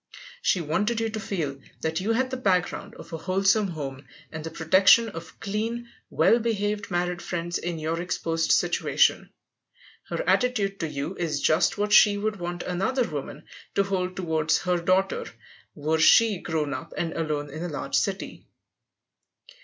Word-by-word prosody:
She 185 - +2
wanted 195 +9 0
you 225 0 0
to 220 - -4
feel 160 -10 -3 0.2
that 160 +2 -1
you 220 +4 +1
had 260 +2 0
the 260 - -2
background 185 -7 0
of - - -12
a 165 - -4
wholesome 195 +4 +2
home, 140 -5 -6 0.2
and 160 -1 -6
the 160 - -4
protection 190 +8 +5
of 165 -4 -10
clean, 225 +4 -3 0.2
well 235 - +4
behaved 210 -2 -1
married 175 -1 -1
friends 175 0 -3
in 175 -1 -3
your 160 +2 -2
exposed 165 -2 -1
situation; - - +2 0.8
her - - -3
attitude 210 -6 +1
to 165 - -1
you 150 +3 -4
is 155 -4 -1
just 160 +7 +2
what 210 +1 0
she 205 -1 +7
would 210 +1 -2
want 175 0 -4
another 235 +8 0
woman - - -6 0.3
to 200 - +4
hold 185 -2 -2
toward 160 -4 -1
her 180 -1 +1
daughter, 185 +2 +1 0.5
were 155 +2 0
she 215 +4 +5
grown 155 -5 -2
up - - -7
and 165 -1 -2
alone 150 -3 -2
in 155 +3 -7
a 175 - -3
large 145 - -6
city. 195 -1 -2
180 Hz, 165 wpm, -26 LUFS, 160-205 Hz, 0.8 s, she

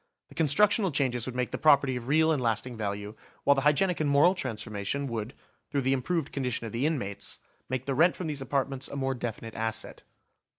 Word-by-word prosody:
The - - -14
constructional 195 - +3
changes 130 -5 0
would 125 - -5
make 125 -1 -1
the - - -4
property 140 -4 +4
of 120 -1 -6
real 160 +3 +4
and 150 -4 +1
lasting 120 +1 -1
value, 105 -1 -4 0.3
while 140 - +6
the 135 - 0
hygienic 155 +6 +2
and 150 -2 +1
moral 145 +6 +5
transformation 115 - -3
would, 115 0 -4 0.3
through 140 - 0
the 130 +1 +2
improved 145 +4 -1
condition 125 -4 -2
of 110 - -5
the 120 +7 0
inmates, 100 -11 -3 0.3
make 130 0 -2
the 140 - -1
rent 170 +6 +4
from 180 - -5
these 150 -3 -2
apartments 135 0 -1
a - - -8
more 135 -1 -1
definite 115 -2 -5
asset. 110 0 -3
135 Hz, 205 wpm, -28 LUFS, 115-150 Hz, 0.3 s, while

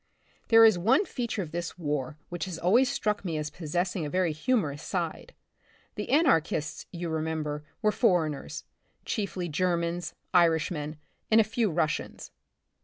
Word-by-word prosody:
There 225 -1 +8
is 215 -5 +5
one 260 - +3
feature 235 - -3
of 155 - -9
this 170 +1 -4
war 150 -3 -3
which 175 -2 -3
has 180 -3 -5
always 230 +10 +4
struck 210 -4 -1
me 165 -5 -2
as 150 0 -3
possessing 175 +2 -2
a 150 - -3
very 180 0 +1
humor 155 - +1
ous 145 +1 -9
side. 180 - -4 0.6
The - - -5
anarchists, 165 - +2
you 175 -1 -4
remember, 155 -2 -2 0.2
were 215 - +4
foreigners, 165 - 0 0.4
chiefly 195 -4 -2
Germans, 170 +1 -1 0.2
Irishmen 160 -3 +2 0.3
and 220 - +6
a - - +7
few 220 +1 0
Russians. 155 -2 -2
175 Hz, 150 wpm, -28 LUFS, 155-210 Hz, 0.6 s, There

